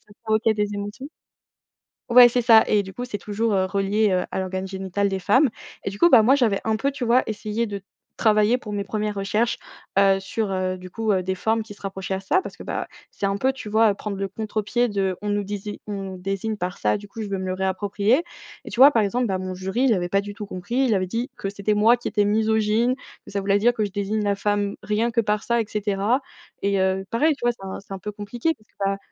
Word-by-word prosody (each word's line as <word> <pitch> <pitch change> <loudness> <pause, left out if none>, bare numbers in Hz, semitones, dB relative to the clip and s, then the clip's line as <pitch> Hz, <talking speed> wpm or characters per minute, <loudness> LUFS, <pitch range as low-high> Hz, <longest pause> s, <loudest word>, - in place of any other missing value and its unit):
ça - - -16
provoquait 220 0 +2
des 210 -1 -1
émotions. 205 +7 -6 1.0
Ouais, 245 0 +9
c'est 245 +1 +1
ça, 225 -2 +7
et 210 -1 +3
du 190 0 -10
coup, 245 - -5
c'est 220 -4 -4
toujours, 210 +2 -1
heu, 190 -1 +2
relié, 200 +3 +1
heu, 185 -1 +1
à - - -2
l'organe 190 0 -3
génital 190 +1 -2
des 195 -1 -2
femmes. 260 +9 +4 0.4
Et, - - 0
du 200 - -8
coup, 345 - +5
bah, 245 -8 +8
moi, 260 +5 +5
j'avais 225 -8 +2
un 220 0 +1
peu, 275 +6 0
tu 270 -3 -4
vois, 240 +2 +4
essayé 215 +1 -2
de 200 -1 -5 0.4
travailler 215 +1 +3
pour 210 -4 -8
mes 200 -1 -1
1res 210 +1 -3
recherches, 210 +4 0 0.4
heu, 195 -1 +5
sur, 200 +1 -3
heu, 185 -1 -1
du 185 0 -10
coup, 220 +2 0
heu, 185 -1 0
des 190 +1 -2
formes 220 +4 0
qui 215 - -11
se - - -20
rapprochaient 195 -1 -4
à - - -3
ça, 195 - +1
parce - - -9
que, - - -9
bah, - - -3 0.2
c'est - - -3
un 195 0 -1
peu, 265 +5 +1
tu 240 -5 -8
vois, 215 -1 +4
prendre 200 0 -5
le 195 0 -2
contre-pied 215 +4 -1
de, 195 -2 0
on 210 - -3
nous 205 0 0
dési 205 +1 -5
on 195 -2 -5
désigne 195 +4 -3
par 180 -1 -4
ça, 105 0 +1
du 205 - -11
coup, 220 +2 -8
je 210 - -5
veux 195 - -1
me 190 - -4
le 185 - -1
réapproprier. 200 - +1 0.4
Et, - - -7
tu 245 - -1
vois, 280 +2 +10
par 225 -5 +3
exemple, 240 +4 0
bah, 190 -2 0
mon 185 0 -4
jury, 190 +7 -2
il 250 - +4
avait 175 -3 -1
pas 195 - +2
du 205 0 -7
tout 210 0 -7
compris, 190 +4 -6
il 260 -3 +3
avait 185 -1 0
dit 230 +7 -3
que 195 - -3
c'était 200 +1 -1
moi 220 +3 +5
qui 240 - -5
étais 205 -2 +2
misogyne, 220 +3 +2 0.3
que - - -11
ça 200 - -1
voulait 200 0 +2
dire 235 +4 +3
que 215 -3 0
je 200 - -6
désigne 205 +2 -1
la 200 -1 +1
femme 205 0 -1
rien 220 +3 0
que 230 - +2
par 210 0 -1
ça, 235 -1 +1
et - - -3
cetera. 210 +3 0 0.4
Et 200 0 +1
heu, 190 0 0
pareil, 300 +6 +2
tu 240 - -5
vois, 240 - +4
c'est 215 - -16
un 190 - -5
c'est 195 0 -10
un 195 - -6
peu 210 +3 -5
compliqué 225 +9 -2
parce 215 - -28
que, - - -36
bah, 195 0 0
205 Hz, 265 wpm, -23 LUFS, 195-225 Hz, 1.0 s, vois